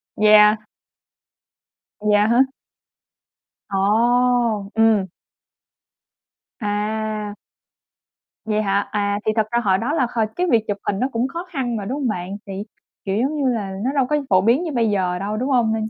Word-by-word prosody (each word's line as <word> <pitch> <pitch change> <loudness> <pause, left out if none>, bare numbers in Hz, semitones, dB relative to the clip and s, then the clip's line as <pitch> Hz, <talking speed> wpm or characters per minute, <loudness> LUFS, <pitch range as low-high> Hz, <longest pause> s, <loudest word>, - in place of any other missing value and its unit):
Yeah. 210 0 +6 1.4
Dạ, 210 0 +3
hả? 235 +3 +4 1.3
Ồ! 230 +1 +2
Ừm. 220 -3 +3 1.5
À. 210 0 -3 1.1
Vậy 215 -1 0
hả? 200 -1 0
À, 205 -1 0
thì 215 - +2
thật 220 -2 +1
ra 235 - +2
hồi 190 -3 +3
đó 235 +9 -2
là 265 -6 +1
hồi 225 -2 +1
cái 360 +1 0
việc 225 -2 +4
chụp 205 - -2
hình 195 - 0
nó 255 - +1
cũng 235 +2 0
khó 335 +6 -6
khăn 255 -7 -2
mà, 205 -3 -4
đúng 260 +7 -3
hông 270 - -1
bạn? 190 -2 -4
Thì, 195 - -6 0.5
kiểu, 195 0 -1
giống 280 +5 0
như 275 -3 +1
là 210 -5 -2
nó 260 - 0
đâu 270 -2 +3
có 300 - +1
phổ 185 -1 +4
biến 235 - +3
như 330 - -3
bây 235 -5 +1
giờ 180 -3 0
đâu, 205 +2 -3
đúng 255 +5 -2
hông? 240 -4 +2
Nên 220 0 -2
220 Hz, 170 wpm, -21 LUFS, 205-245 Hz, 1.5 s, Yeah